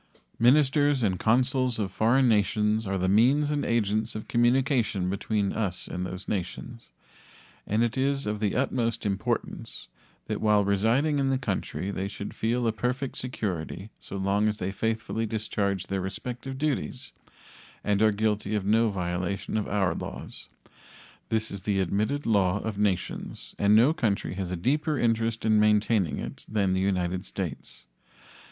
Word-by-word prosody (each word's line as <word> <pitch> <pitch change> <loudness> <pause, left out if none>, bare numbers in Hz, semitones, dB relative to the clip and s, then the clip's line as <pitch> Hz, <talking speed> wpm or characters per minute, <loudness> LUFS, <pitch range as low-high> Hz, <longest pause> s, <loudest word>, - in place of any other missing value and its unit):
Ministers 140 +2 +4
and 95 -4 +1
consuls 125 +1 +2
of 100 -4 -2
foreign 120 +6 +3
nations 105 0 +2
are 95 0 -1
the 95 0 0
means 130 +9 +4
and 145 -1 0
agents 110 -1 0
of 110 - -6
communication 120 -6 +2
between 100 0 -1
us 95 -5 -2
and 90 +1 -3
those 95 +1 -7
nations, 105 +5 -5 0.8
and 110 +3 +2
it 120 - 0
is 135 +1 0
of 105 0 -2
the 105 -2 0
utmost 120 -3 0
importance 100 -2 -3 0.4
that - - -3
while 105 -2 +4
residing 115 +10 +2
in 135 -1 +1
the 135 - +2
country 100 -4 -3
they 95 0 -3
should 100 0 -6
feel 120 +2 0
a 115 - +3
perfect 125 +4 -2
security 100 -5 -4
so 100 - -7
long 100 +2 +1
as 105 - -2
they 95 0 -2
faithfully 110 +1 -2
discharge 100 -3 -1
their 95 -1 -2
respective 125 +7 -5
duties 140 -2 -2 0.7
and 105 0 +1
are 110 0 +5
guilty 105 0 0
of 100 -2 -1
no 110 +2 +3
violation 90 +1 -3
of 110 - 0
our 95 -5 +1
laws. - - -7 0.8
This 110 0 0
is 100 - -5
the 100 0 0
admitted 105 - 0
law 100 -4 +3
of 110 -2 -4
nations 100 -4 -2
and 100 +1 +5
no 125 +8 +6
country 105 - -1
has 95 -1 -4
a 90 - -3
deeper 150 - 0
interest 115 -1 0
in 110 -1 +4
maintaining 105 -3 +2
it - - -6
than 100 -3 +1
the 95 - +1
United 90 -1 0
States. 80 -11 -6
105 Hz, 160 wpm, -27 LUFS, 100-120 Hz, 0.8 s, no